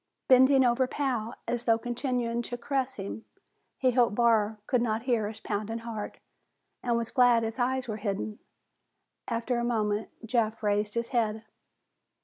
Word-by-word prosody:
Bending 260 Hz, +1 st, +6 dB
over 245 Hz, +1 st, +3 dB
Pal, 250 Hz, -6 st, -2 dB
as 240 Hz, 0 st, -2 dB
though 225 Hz, -1 st, +4 dB
continuing 240 Hz, 0 st, -2 dB
to 245 Hz, +1 st, -5 dB
caress 265 Hz, 0 st, -1 dB
him, 200 Hz, +1 st, -6 dB, 0.5 s
he 255 Hz, -1 st, +3 dB
hoped 240 Hz, -3 st, +3 dB
Barr 220 Hz, -2 st, +3 dB
could 250 Hz, +1 st, +1 dB
not 225 Hz, -1 st, 0 dB
hear 235 Hz, -5 st, +1 dB
his 215 Hz, +1 st, -7 dB
pounding 215 Hz, +1 st, -3 dB
heart, 225 Hz, -2 st, -6 dB, 0.6 s
and 240 Hz, -1 st, +1 dB
was 230 Hz, -1 st, -3 dB
glad 245 Hz, -3 st, +5 dB
his 225 Hz, +2 st, -4 dB
eyes 255 Hz, +1 st, 0 dB
were 215 Hz, -2 st, -3 dB
hidden. 205 Hz, 0 st, -3 dB, 0.9 s
After 235 Hz, +1 st, -1 dB
a -, -, -1 dB
moment, 215 Hz, -3 st, 0 dB, 0.2 s
Jeff 225 Hz, -1 st, 0 dB
raised 210 Hz, +1 st, 0 dB
his 235 Hz, 0 st, -1 dB
head. 220 Hz, -3 st, 0 dB
235 Hz, 155 wpm, -28 LUFS, 220-245 Hz, 0.9 s, Bending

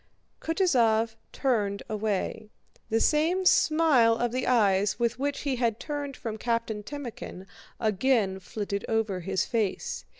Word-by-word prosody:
Kutúzov 235 Hz, -, +2 dB, 0.2 s
turned 210 Hz, -7 st, 0 dB
away. 215 Hz, 0 st, -2 dB, 0.4 s
The 225 Hz, -, +2 dB
same 325 Hz, +8 st, +2 dB
smile 310 Hz, -10 st, +4 dB
of 240 Hz, 0 st, -1 dB
the 255 Hz, +1 st, -2 dB
eyes 205 Hz, -5 st, +3 dB
with 235 Hz, 0 st, 0 dB
which 285 Hz, +1 st, -2 dB
he 275 Hz, -3 st, -1 dB
had 230 Hz, -3 st, 0 dB
turned 290 Hz, -3 st, -5 dB
from 220 Hz, -2 st, -5 dB
Captain 230 Hz, -2 st, -1 dB
Timókhin 235 Hz, -7 st, -7 dB, 0.3 s
again 215 Hz, -2 st, +1 dB
flitted 200 Hz, +1 st, -4 dB
over 220 Hz, -4 st, 0 dB
his 190 Hz, +2 st, -1 dB
face. 220 Hz, -5 st, -2 dB
230 Hz, 130 wpm, -27 LUFS, 210-265 Hz, 0.4 s, smile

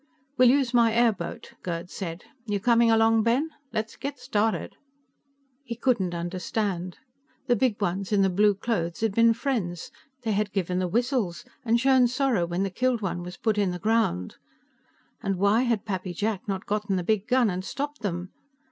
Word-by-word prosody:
"We'll 255 Hz, -2 st, +6 dB
use 260 Hz, -2 st, +2 dB
my 235 Hz, -2 st, +5 dB
airboat," 230 Hz, -3 st, 0 dB
Gerd 170 Hz, 0 st, -5 dB
said. 170 Hz, -3 st, -6 dB, 0.2 s
"You 205 Hz, -1 st, 0 dB
coming 235 Hz, +2 st, +4 dB
along, 225 Hz, 0 st, +4 dB
Ben? 250 Hz, +8 st, +1 dB, 0.2 s
Let's 220 Hz, 0 st, -3 dB
get 280 Hz, 0 st, -5 dB
started." 225 Hz, -4 st, -1 dB, 0.9 s
He 240 Hz, -4 st, -5 dB
couldn't 225 Hz, -8 st, 0 dB
understand. 180 Hz, +1 st, -3 dB, 0.5 s
The 245 Hz, -, +3 dB
Big 240 Hz, -5 st, +1 dB
Ones 195 Hz, 0 st, -2 dB
in 200 Hz, -2 st, +4 dB
the 195 Hz, -, +3 dB
blue 205 Hz, +2 st, +3 dB
clothes 190 Hz, -5 st, -2 dB
had 225 Hz, -3 st, +1 dB
been 230 Hz, +1 st, +4 dB
friends; 210 Hz, -, -3 dB, 0.3 s
they 225 Hz, -, 0 dB
had 210 Hz, 0 st, 0 dB
given 180 Hz, -2 st, -1 dB
the 185 Hz, -, 0 dB
whistles, 235 Hz, -3 st, -1 dB, 0.2 s
and 235 Hz, -1 st, +2 dB
shown 260 Hz, -1 st, +5 dB
sorrow 245 Hz, -8 st, +1 dB
when 175 Hz, +3 st, -1 dB
the 195 Hz, -, -2 dB
killed 245 Hz, +2 st, 0 dB
one 180 Hz, -2 st, -2 dB
was 180 Hz, +1 st, -8 dB
put 215 Hz, -2 st, 0 dB
in 200 Hz, -2 st, +2 dB
the 180 Hz, -, -3 dB
ground. 185 Hz, -, 0 dB, 0.8 s
And 195 Hz, -, -1 dB
why 200 Hz, +5 st, +3 dB
had 225 Hz, -4 st, 0 dB
Pappy 185 Hz, -3 st, -4 dB
Jack 210 Hz, +1 st, -2 dB
not 195 Hz, -1 st, -3 dB
gotten 205 Hz, -1 st, -1 dB
the 180 Hz, -, -1 dB
big 215 Hz, +2 st, 0 dB
gun 250 Hz, -4 st, +3 dB
and 180 Hz, +1 st, -3 dB
stopped 290 Hz, +7 st, -5 dB
them. 180 Hz, -3 st, -3 dB
210 Hz, 180 wpm, -26 LUFS, 185-235 Hz, 0.9 s, We'll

